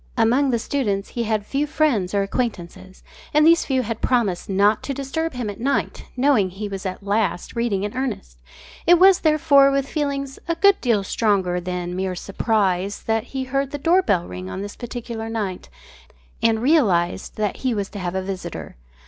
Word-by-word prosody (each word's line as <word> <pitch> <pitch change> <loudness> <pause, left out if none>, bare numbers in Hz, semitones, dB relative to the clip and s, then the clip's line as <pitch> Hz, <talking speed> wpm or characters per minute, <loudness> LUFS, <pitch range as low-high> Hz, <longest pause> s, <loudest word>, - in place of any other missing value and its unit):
Among 250 +5 +3
the 240 - +2
students 215 -5 -2
he 235 -1 -3
had 215 -2 -1
few 280 +6 -1
friends 255 -12 +1
or 200 - +2
acquaintances, 190 -4 -4 0.3
and 300 0 +6
these 335 +1 +5
few 260 -2 0
had 225 0 -4
promised 215 -9 0
not 200 +2 +3
to 275 - -4
disturb 280 +4 -3
him 245 -3 -4
at 205 +1 -6
night, 275 +4 -1
knowing 250 -8 +3
he 200 +3 -6
was 195 -1 -5
at 185 +2 -6
last 200 -4 -1
reading 230 -5 0
in 205 +2 -4
earnest. 225 - -4 0.5
It 350 +1 +7
was, 375 +1 +6
therefore, 305 -3 +5
with 275 0 0
feelings 275 -3 -3
a 335 - 0
good 395 +3 +4
deal 230 -6 +2
stronger 190 -4 +1
than 180 0 -4
mere 185 0 -2
surprise 195 -1 -1
that 225 0 0
he 265 +1 -4
heard 275 +1 -2
his 290 - -5
door 355 +3 +5
bell 185 - 0
ring 90 +1 -7
on 190 - -5
this 205 - -7
particular 235 -2 -6
night 205 - -4 0.7
and 225 0 +2
realised 205 - +2
that 210 -2 -2
he 255 -3 -1
was 200 -2 -2
to 205 - -8
have 180 0 -3
a 190 - -1
visitor. 180 - -6
225 Hz, 190 wpm, -22 LUFS, 195-275 Hz, 0.7 s, It